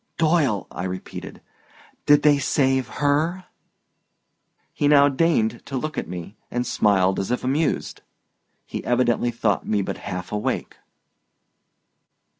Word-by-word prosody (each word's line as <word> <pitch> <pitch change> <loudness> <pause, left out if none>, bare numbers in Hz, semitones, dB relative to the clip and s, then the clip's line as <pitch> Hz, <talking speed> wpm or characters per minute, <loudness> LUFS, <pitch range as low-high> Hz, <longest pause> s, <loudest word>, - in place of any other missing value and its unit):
"Doyle," 155 - +2
I 90 - -5
repeated, 95 0 -7 0.7
"did 145 0 +6
they 145 -1 +5
save 130 -1 +1
her?" 155 +6 0 1.3
He 145 - 0
now 145 -1 +6
deigned 135 -6 +1
to 135 - -3
look 155 +4 -4
at - - -3
me 90 +3 -7
and 125 0 -2
smiled 100 -6 +2
as 95 - -3
if 125 - -1
amused. 140 +4 -1 0.6
He - - -6
evidently 120 -1 +1
thought 115 -4 -1
me 105 -2 +1
but - - -5
half 90 0 -6
awake. 105 0 -3
125 Hz, 125 wpm, -23 LUFS, 105-145 Hz, 1.3 s, did